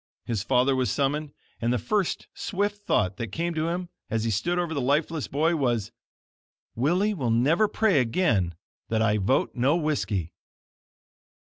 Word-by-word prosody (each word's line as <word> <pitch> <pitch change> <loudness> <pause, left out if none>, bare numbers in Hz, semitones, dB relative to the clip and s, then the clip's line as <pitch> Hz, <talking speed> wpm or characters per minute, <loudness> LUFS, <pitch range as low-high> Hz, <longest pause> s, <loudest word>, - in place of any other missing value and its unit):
His 115 -5 -1
father 130 +4 +2
was 130 -1 +1
summoned, 145 +1 0 0.3
and 120 +1 +1
the 125 - +2
first 200 - -1
swift 205 +1 -3
thought 95 -1 +1
that 115 - -3
came 170 +1 -2
to 160 0 -1
him, 175 +1 -3 0.2
as 115 -1 -1
he 115 - 0
stood 170 - 0
over 175 -2 -1
the 140 - -1
lifeless 150 +3 0
boy, 160 +4 +1
was: 120 -8 0 0.8
"Willie 180 - +1
will 135 - -2
never 145 - +3
pray 205 -6 +2
again 115 - +1 0.3
that 110 0 +1
I 105 -1 +2
vote 100 +7 +1
No 135 +5 +2
Whiskey." 140 - -1
140 Hz, 160 wpm, -26 LUFS, 115-170 Hz, 0.8 s, never